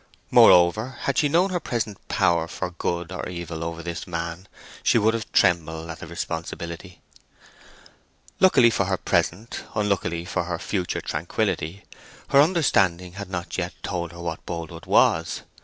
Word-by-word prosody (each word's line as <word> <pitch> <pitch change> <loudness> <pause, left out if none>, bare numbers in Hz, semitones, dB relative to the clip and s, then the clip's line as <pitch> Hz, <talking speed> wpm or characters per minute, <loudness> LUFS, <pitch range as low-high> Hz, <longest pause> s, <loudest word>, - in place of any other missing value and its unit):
Moreover, 105 +9 +6
had 140 - +1
she 145 - +2
known 175 +5 +3
her 180 - 0
present 110 - -4
power 85 -1 +2
for 90 - -4
good 85 0 -3
or 90 - -5
evil 85 -2 -5
over 85 0 -5
this 85 -1 -5
man, 85 +2 -5 0.3
she - - +3
would 110 0 +3
have 115 -2 -4
trembled 80 -3 +2
at 80 - -9
her - - -8
responsibility. 85 +1 -6 1.4
Luckily 130 -11 +6
for 100 - +1
her 95 0 0
present, 105 +8 -1
unluckily 100 -5 0
for 90 -1 -2
her 90 -1 -3
future 90 +1 -2
tranquillity, 85 +6 -2 0.5
her 140 - +7
understanding 100 - +2
had 100 0 -7
not 90 -1 -4
yet 90 0 -3
told 85 -3 -3
her 85 - -12
what 85 -2 -4
Boldwood 85 -1 -7
was. 80 +1 +3
90 Hz, 155 wpm, -24 LUFS, 85-105 Hz, 1.4 s, her